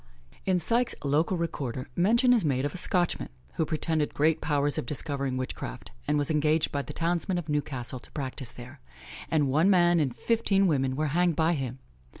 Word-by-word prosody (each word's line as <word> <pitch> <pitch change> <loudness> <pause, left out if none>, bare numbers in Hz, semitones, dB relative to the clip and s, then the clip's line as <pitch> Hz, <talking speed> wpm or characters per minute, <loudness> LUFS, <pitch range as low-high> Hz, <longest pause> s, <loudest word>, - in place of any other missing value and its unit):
In 185 -1 +3
Syke's 235 +8 +2
Local 155 +6 +1
Recorder, 135 -7 -4
mention 235 +8 +4
is 230 -5 +2
made 135 -3 0
of 145 - -3
a - - -5
Scotchman, 175 -1 +2 0.2
who 160 - -1
pretended 155 -1 0
great 160 +2 +2
powers 145 -1 +1
of - - -5
discovering 140 -2 -2
witchcraft, 130 -1 -6 0.2
and 150 0 +2
was 145 +1 +2
engaged 155 +1 +2
by 140 - -1
the - - -8
townsmen 175 +2 -1
of 175 -3 -4
Newcastle 135 -4 -3
to - - -15
practise 130 -3 -5
there; 130 +3 -12 0.5
and 150 -3 +2
one 155 +8 +3
man 175 -3 +4
and 135 -6 -1
fifteen 215 -4 +1
women 135 -6 +1
were 155 +1 -1
hanged 175 -1 +2
by 160 +2 +2
him. 130 -4 -4
155 Hz, 185 wpm, -27 LUFS, 140-175 Hz, 0.5 s, mention